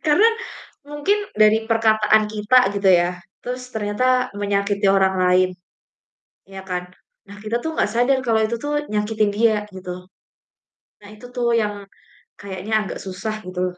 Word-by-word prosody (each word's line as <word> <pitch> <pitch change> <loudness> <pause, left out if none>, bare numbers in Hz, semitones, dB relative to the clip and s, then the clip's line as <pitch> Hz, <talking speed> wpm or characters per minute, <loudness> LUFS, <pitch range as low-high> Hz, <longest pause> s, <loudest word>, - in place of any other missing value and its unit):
karena 380 +10 +5 0.6
mungkin 295 +8 0 0.2
dari 215 +1 +4
perkataan 220 -1 +3
kita 215 +2 +3
gitu 200 -1 +2
ya, 175 0 +3 0.3
terus 250 +1 -5
ternyata 250 +4 +1
menyakiti 200 0 0
orang 190 -1 +3
lain, 185 0 +4 1.0
ya 195 0 -8
kan. 180 -1 -4 0.4
Nah 200 - -11
kita 215 +3 -3
tuh 320 +3 -5
gak - - +1
sadar 245 +3 +3
kalau 225 -2 +2
itu 220 +2 -1
tuh 295 +3 -2
nyakitin 210 0 0
dia 215 +2 +2
gitu. 180 -1 -9 0.9
Nah 205 - -14
itu 215 +4 -12
tuh 240 -2 +1
yang 210 -2 0 0.6
kayaknya 200 +2 -5
agak - - -6
susah 200 +3 -5
gitu. 185 0 -3
215 Hz, 145 wpm, -21 LUFS, 200-235 Hz, 1.0 s, karena